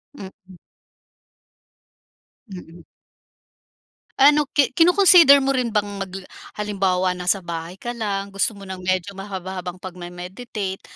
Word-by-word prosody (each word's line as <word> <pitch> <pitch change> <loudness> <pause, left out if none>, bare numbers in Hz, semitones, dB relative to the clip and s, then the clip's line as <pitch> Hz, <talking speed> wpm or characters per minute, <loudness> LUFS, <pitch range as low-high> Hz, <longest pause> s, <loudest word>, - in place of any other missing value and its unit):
Mm. 190 -4 -13 2.0
Mm. 170 -2 -12 1.4
Ano, 290 +1 +5
ki 280 -2 +1
kino-consider 345 -3 +7
mo 275 0 0
rin 250 -3 -1
bang 210 -1 0 0.2
mag 195 - -5 0.5
halimbawa 190 -3 0
nasa 180 +2 0
bahay 170 -1 -7
ka 240 +4 -6
lang, 200 -4 -4
gusto 200 +2 -1
mo 200 - -11
ng 190 -1 -8
medyo 185 +1 -2
mahaba-habang 190 -2 -7
pagme-meditate, 185 +3 -7
195 Hz, 110 wpm, -21 LUFS, 180-235 Hz, 2.0 s, kino-consider